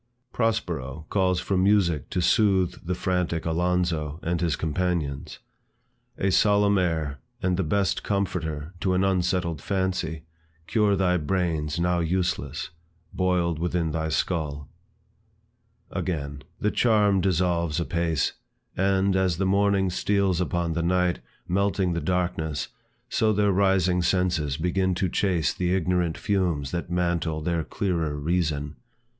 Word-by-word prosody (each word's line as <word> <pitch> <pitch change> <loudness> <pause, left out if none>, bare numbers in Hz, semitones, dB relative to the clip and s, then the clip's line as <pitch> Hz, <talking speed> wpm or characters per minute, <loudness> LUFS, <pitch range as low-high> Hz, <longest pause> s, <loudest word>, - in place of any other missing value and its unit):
Prospero 85 - -1
calls 95 -3 +2
for 100 - -1
music 90 -6 +2
to 90 - -1
soothe 95 -4 +2
the 90 - 0
frantic 90 -3 -1
Alonzo, 85 -2 0
and 85 0 -1
his 85 -4 +1
companions; 80 -3 -2 0.8
A 95 - +1
solemn 100 0 +4
air, 80 -6 -1 0.2
and 90 -1 +2
the 95 - 0
best 95 +4 0
comforter 85 -5 -2
To 95 0 +1
an 95 - +2
unsettled 90 -4 0
fancy, 95 -4 -2 0.4
cure 105 -1 +2
thy 90 -2 +2
brains 80 -2 -1
Now 90 0 +1
useless, 85 -5 -1 0.4
boiled 90 -3 +1
within 85 -1 0
thy 80 0 -2
skull. 75 -3 -2 1.2
Again; 70 -5 -3 0.2
The 105 - +1
charm 105 -5 +3
dissolves 85 -3 +1
apace, 85 -3 0 0.4
And, 95 0 +2
as 95 -3 +1
the 95 - 0
morning 100 -1 +2
steals 95 -1 +1
upon 85 -2 -1
the 85 - -1
night, 90 -4 +1 0.3
Melting 95 -1 +1
the 85 - -2
darkness, 80 -3 -1 0.4
so 110 -1 +2
their 105 -1 +2
rising 95 -2 +2
senses 85 -6 +1
Begin 90 +2 0
to 95 0 0
chase 90 -3 +1
the 90 0 0
ignorant 90 -2 0
fumes 85 -9 0
that 85 0 -3
mantle 85 -3 0
Their 85 -1 0
clearer 85 -5 -1
reason. 75 -2 -1
90 Hz, 130 wpm, -25 LUFS, 80-95 Hz, 1.2 s, solemn